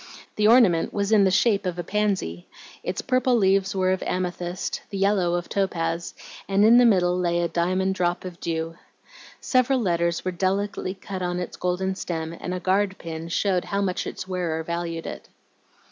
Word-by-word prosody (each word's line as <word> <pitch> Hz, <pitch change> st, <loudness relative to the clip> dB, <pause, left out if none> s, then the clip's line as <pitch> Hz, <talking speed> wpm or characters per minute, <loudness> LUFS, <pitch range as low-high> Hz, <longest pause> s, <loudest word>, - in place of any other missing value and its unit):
The 210 Hz, 0 st, +3 dB
ornament 220 Hz, -8 st, +5 dB
was 200 Hz, 0 st, 0 dB
in 210 Hz, -3 st, +6 dB
the -, -, +4 dB
shape 205 Hz, +2 st, +3 dB
of 180 Hz, -1 st, -3 dB
a 175 Hz, -, -3 dB
pansy; 195 Hz, -, -1 dB, 0.3 s
its 180 Hz, -, -4 dB
purple 255 Hz, -1 st, +2 dB
leaves 195 Hz, -2 st, +2 dB
were 185 Hz, -1 st, +2 dB
of 190 Hz, -, -1 dB
amethyst, 180 Hz, 0 st, -3 dB
the 200 Hz, -, -5 dB
yellow 195 Hz, -3 st, +2 dB
of 175 Hz, 0 st, -3 dB
topaz, 170 Hz, -3 st, -2 dB, 0.3 s
and 195 Hz, +1 st, +3 dB
in 235 Hz, +2 st, +7 dB
the 245 Hz, -, +6 dB
middle 180 Hz, -4 st, +3 dB
lay 175 Hz, -1 st, 0 dB
a 170 Hz, -, +1 dB
diamond 185 Hz, +3 st, 0 dB
drop 180 Hz, 0 st, -1 dB
of 180 Hz, -2 st, -8 dB
dew. 165 Hz, 0 st, -3 dB, 0.6 s
Several 255 Hz, 0 st, +2 dB
letters 170 Hz, -5 st, 0 dB
were 185 Hz, -, 0 dB
delicately 190 Hz, +1 st, -1 dB
cut 190 Hz, 0 st, -7 dB
on 180 Hz, 0 st, -1 dB
its 180 Hz, -, -5 dB
golden 180 Hz, +1 st, -1 dB
stem, 165 Hz, -3 st, -4 dB
and 180 Hz, -, -5 dB
a 180 Hz, -, -2 dB
guard 190 Hz, +1 st, +1 dB
pin 165 Hz, 0 st, -7 dB
showed 185 Hz, +1 st, 0 dB
how 200 Hz, 0 st, -1 dB
much 185 Hz, -2 st, -2 dB
its -, -, -6 dB
wearer 175 Hz, -4 st, -2 dB
valued 170 Hz, 0 st, -4 dB
it. -, -, -8 dB
185 Hz, 185 wpm, -24 LUFS, 175-200 Hz, 0.6 s, in